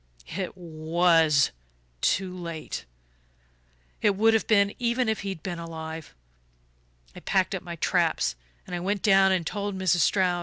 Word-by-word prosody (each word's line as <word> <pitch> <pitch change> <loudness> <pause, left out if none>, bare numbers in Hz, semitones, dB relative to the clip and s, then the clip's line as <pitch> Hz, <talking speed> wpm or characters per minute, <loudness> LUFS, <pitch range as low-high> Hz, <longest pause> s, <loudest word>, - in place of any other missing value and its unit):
"It 190 0 -4
WAS 160 -3 +2 0.5
too 185 -1 +1
late 170 -3 -6 1.2
it 205 -2 +3
would 225 +3 +4
have 220 - +1
been, 200 -2 +4
even 240 0 +1
if 220 -1 0
he'd 195 -5 -5
been 175 -3 -4
alive. 160 - -7 1.0
I - - -8
packed - - +1
up - - -3
my - - -7
traps, - - +1 0.3
and 175 -1 -5
went 200 +1 -1
down 195 -2 +5
and 180 -3 +1
told 200 +2 -3
Mrs. 185 -2 +2
Stroud. 180 +2 +2
185 Hz, 145 wpm, -26 LUFS, 165-200 Hz, 1.2 s, down